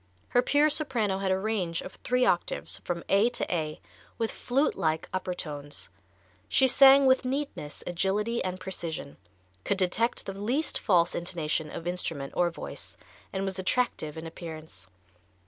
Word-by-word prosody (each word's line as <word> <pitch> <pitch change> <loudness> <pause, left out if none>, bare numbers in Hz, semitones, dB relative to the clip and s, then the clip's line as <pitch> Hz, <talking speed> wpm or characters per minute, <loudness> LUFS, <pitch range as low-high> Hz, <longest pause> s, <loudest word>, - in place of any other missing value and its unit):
Her 245 - +4
pure 295 +3 +4
soprano 235 -11 0
had 195 -1 0
a 190 - +3
range 190 -5 -1
of - - -8
three 250 0 +1
octaves, 175 - 0
from 170 -1 -4
A 205 +4 +4
to 240 - -2
A, 155 -2 -2 0.4
with 225 -1 -1
flute 275 +5 +1
like 160 0 0
upper 185 -1 -2
tones. 145 - -6 0.6
She 265 - +5
sang 270 +1 +8
with 260 0 +5
neatness, 260 - -3
agility 205 +6 0
and 185 0 -3
precision, 170 - -5 0.5
could 200 - 0
detect 200 +6 +1
the 195 - -4
least 235 +11 -1
false 175 -4 +3
intonation 160 -3 -2
of 165 - -7
instrument 165 -6 -3
or 175 -1 +3
voice, 165 - -8 0.3
and 195 0 -2
was 190 -1 -3
attractive 185 -7 0
in 160 - -6
appearance. 160 - -9
190 Hz, 155 wpm, -28 LUFS, 165-235 Hz, 0.6 s, sang